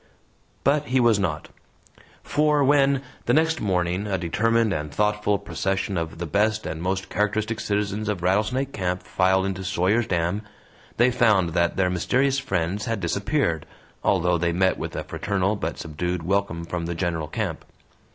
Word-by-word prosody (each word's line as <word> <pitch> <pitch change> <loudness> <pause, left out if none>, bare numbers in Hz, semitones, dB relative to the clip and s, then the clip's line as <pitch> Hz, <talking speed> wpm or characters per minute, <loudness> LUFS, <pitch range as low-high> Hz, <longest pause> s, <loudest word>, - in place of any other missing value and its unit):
But 145 +2 +2
he 130 0 +1
was 115 -4 +4
not. 80 -6 -2 0.7
For 150 -1 +2
when, 140 -1 +3 0.2
the 120 - +4
next 160 +1 +2
morning, 90 0 0
a 95 -2 0
determined 110 +5 +1
and 75 -3 -3
thoughtful 105 +2 +1
procession 95 +2 -2
of 80 -2 -3
the 85 - -4
best 105 +6 +1
and 80 0 -4
most 95 +1 -1
characteristic 105 +1 -1
citizens 105 +1 -1
of 95 -5 -2
Rattlesnake 110 +9 +1
Camp 90 -2 -2
filed 95 +1 +2
into 95 -1 -3
Sawyer's 95 +6 +1
Dam, 85 +2 0 0.6
they 120 +2 +4
found 105 -8 +3
that 85 +1 0
their 95 -1 +2
mysterious 130 +9 +1
friends 100 -5 -2
had 115 -2 -1
disappeared, 85 - -1 0.4
although 90 0 +2
they 85 0 +1
met 95 +2 +2
with - - -5
a - - -3
fraternal 100 0 -1
but 100 - -4
subdued 85 +2 -3
welcome 90 -2 -1
from 85 -1 -3
the 85 - -3
general 85 -3 -2
camp. - - -3
95 Hz, 160 wpm, -24 LUFS, 85-110 Hz, 0.7 s, was